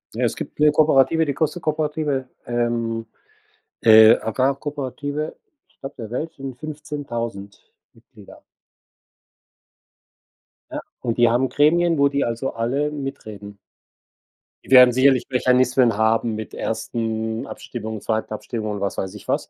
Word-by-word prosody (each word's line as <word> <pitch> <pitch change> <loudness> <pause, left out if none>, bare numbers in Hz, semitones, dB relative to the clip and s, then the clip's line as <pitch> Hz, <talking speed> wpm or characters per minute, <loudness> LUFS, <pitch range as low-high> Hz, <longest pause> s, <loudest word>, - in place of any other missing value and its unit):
Ja, - - -1
es - - -1
gibt - - -8
'ne 150 0 +5
Kooperative, 155 +1 +3
die 145 - -1
Coste 155 +4 -1
Kooperative, 150 -4 -2 0.2
ähm, 120 -1 -2 0.8
äh, 110 0 +8
Agrarkooperative, 140 +4 -3 0.3
Stadt 135 0 -11
der 110 -2 -7
Welt, 155 +6 -4
sind 135 -2 -8
15.000 120 -9 -6 0.3
Mitglieder. - - -17 2.3
Ja, - - -4 0.2
und 115 -1 -2
die 120 -1 +5
haben 125 +3 +1
Gremien, 165 +3 +3
wo 140 0 +4
die 140 0 0
also 120 +3 -3
alle 130 +6 -1
mitreden. 110 -8 -7 1.1
Die - - -15
werden 125 -1 +8
sicherlich 130 0 +3
Mechanismen 125 -2 +2
haben 110 +1 +1
mit 110 0 -7
ersten 110 0 -3
Abstimmung, 110 -2 -7
zweiten 110 +1 -2
Abstimmung 110 0 -5
und 105 -1 -5
was 100 - -2
weiß 95 +1 -3
ich 105 - -12
was, - - -1
125 Hz, 130 wpm, -22 LUFS, 115-145 Hz, 2.3 s, äh